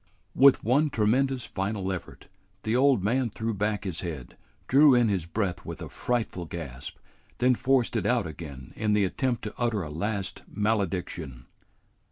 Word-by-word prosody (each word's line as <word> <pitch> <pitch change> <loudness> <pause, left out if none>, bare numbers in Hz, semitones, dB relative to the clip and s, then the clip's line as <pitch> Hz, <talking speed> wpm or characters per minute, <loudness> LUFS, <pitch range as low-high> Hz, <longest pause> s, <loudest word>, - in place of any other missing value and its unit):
With 135 0 +6
one 145 +6 +3
tremendous 130 +3 +1
final 95 0 -2
effort, 95 - -7 0.4
the 110 +2 0
old 130 -5 +4
man 120 +4 +1
threw 110 +1 -3
back 105 +1 -1
his 90 -5 -3
head, 75 -8 -6 0.3
drew 140 0 +6
in 120 -2 +4
his 95 -5 -1
breath 90 -1 -2
with - - -7
a - - -7
frightful 115 -7 -2
gasp, 70 -7 -7 0.4
then 125 +1 +4
forced 130 -1 +1
it 105 -3 0
out 120 -4 +2
again 70 -5 -8
in 105 -1 0
the 105 -1 +3
attempt 120 +4 -1
to 105 - -5
utter 115 -5 0
a 75 - -6
last 100 +3 -3
malediction. 95 - -2
105 Hz, 165 wpm, -27 LUFS, 90-125 Hz, 0.4 s, With